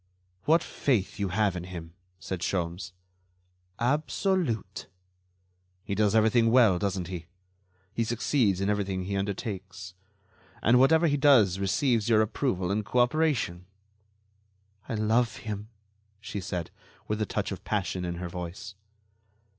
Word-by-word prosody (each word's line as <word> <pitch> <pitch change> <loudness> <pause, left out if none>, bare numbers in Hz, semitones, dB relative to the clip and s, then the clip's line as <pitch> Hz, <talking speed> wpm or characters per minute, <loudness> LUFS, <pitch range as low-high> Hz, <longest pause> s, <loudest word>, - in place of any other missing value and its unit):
"What 160 +2 +4
faith 115 -6 -1
you 100 -2 0
have 100 0 +1
in 90 0 -5
him!" 85 -3 -8 0.3
said 95 -1 -5
Sholmes. 90 +1 -2 0.8
"Absolute." 140 - -1 1.0
"He - - -4
does 105 +1 +2
everything 115 +1 +4
well, 115 -7 +5
doesn't 95 -3 -2
he? 85 -3 -6 0.7
He 115 - 0
succeeds 115 -4 +1
in 100 - 0
everything 100 -2 -1
he 100 +2 -3
undertakes. 95 -2 -4 0.7
And 125 +2 +5
whatever 160 +5 +5
he 145 -3 +2
does 120 -10 +5
receives 115 +3 +1
your 110 -1 +5
approval 100 -5 -1
and 105 +2 0
cooperation." 120 - +1 1.2
"I - - -1
love 110 +2 +1
him," 105 -1 -6 0.5
she 105 -1 -5
said, 90 -3 -4 0.4
with 105 0 -2
a 105 - 0
touch - - -2
of - - -6
passion 90 - -2
in 85 -1 -3
her 90 +1 -5
voice. 90 +4 -7
105 Hz, 130 wpm, -28 LUFS, 95-120 Hz, 1.2 s, well